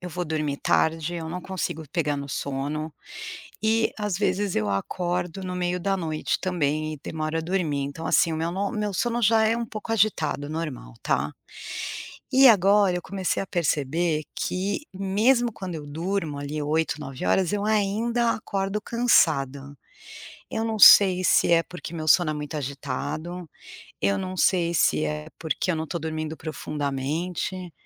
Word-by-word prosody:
eu 180 - -7
vou 180 +2 -3
dormir 150 -3 -2
tarde, 160 +1 +1
eu 165 -1 -4
não 180 +1 -4
consigo 175 -4 -4
pegar 150 -4 0
no 140 0 -5
sono 145 +4 -3 0.7
e, 220 +1 +2
às 205 -3 -1
vezes, 200 -1 0
eu 105 -1 +1
acordo 175 - -2
no 180 -1 -4
meio 180 0 -1
da 195 +2 0
noite 160 -4 -2
também 155 -4 -1
e 150 - -9
demoro 155 0 -3
a - - -1
dormir, 160 -5 -1
então, 160 +4 -5
assim, 165 - +3
o - - -2
meu 165 +2 -1
no 200 +4 -2
meu 210 -3 -2
sono 240 +2 0
já 220 0 +4
é 225 - +2
um 235 - -2
pouco 215 +1 -6
agitado, 160 -9 +1
normal, 150 - -5
tá. 75 +2 0 1.0
E 265 +1 +8
agora 200 -3 +5
eu - - -2
comecei 190 -2 -2
a - - -6
perceber 155 -2 0
que 195 +2 -2
mesmo 225 +6 +2
quando 185 -5 -6
eu 150 - -8
durmo 160 0 -2
ali 145 +2 -4
8, 155 +1 0
9 135 -3 -6
horas, 185 -2 +2
eu 205 0 -1
ainda 220 +3 +1
acordo 200 -1 -2
cansada, 145 - +2 0.8
eu 220 - -1
não 220 -1 -1
sei 185 -2 +9
se 175 - +4
é 165 -1 +5
porque 180 0 -9
meu 155 -1 -4
sono 170 +1 +5
é - - -2
muito 150 0 -5
agitado, 145 +5 -4 0.5
eu 100 0 +2
não 185 - -4
sei 170 -2 +2
se 75 - +3
é 75 0 -4
porque 160 +3 -2
eu 165 - -1
não 160 - -2
tô 170 - -3
dormindo 155 0 -4
profundamente, 155 +5 -3
170 Hz, 170 wpm, -25 LUFS, 150-195 Hz, 1.0 s, sei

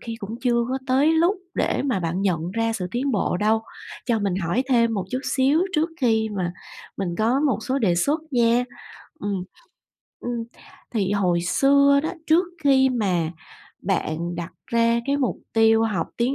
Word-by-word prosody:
khi 230 -1 -6
cũng 210 0 -6
chưa 240 -2 +2
có 265 +1 -1
tới 275 +4 +3
lúc 340 +5 +3 0.2
để - - 0
mà 250 -9 0
bạn 175 +2 -2
nhận 175 -3 0
ra 225 +3 0
sự 195 -5 -3
tiến 260 +5 -1
bộ 195 -4 0
đâu. 220 +3 +1 0.4
Cho 235 -3 +2
mình 200 -3 -1
hỏi 190 +6 0
thêm 230 -3 +3
một 195 -3 -2
chút 255 - -2
xíu 275 +4 +2
trước 320 +2 +1
khi 220 -3 +2
mà 175 -2 -1 0.4
mình 195 -2 -2
có 235 +5 +2
một 255 -8 +1
số 265 +3 -1
đề 195 -8 +2
xuất 285 - +1
nha. 240 -1 +3 0.6
Ừm. 195 -3 -2 0.8
Ưm, 240 -1 -3 0.5
thì 195 -4 0
hồi 180 -4 +1
xưa 280 +8 +4
đó, - - -1 0.2
trước 330 +4 +4 0.2
khi 265 -1 +5
mà 185 -9 0 0.5
bạn 175 -2 -2
đặt 170 -1 -6
ra 235 0 +2
cái 280 - +1
mục 265 -4 0 0.2
tiêu 225 0 +4
học 215 -4 -1
tiếng 245 +3 +1
230 Hz, 180 wpm, -23 LUFS, 195-265 Hz, 0.8 s, khi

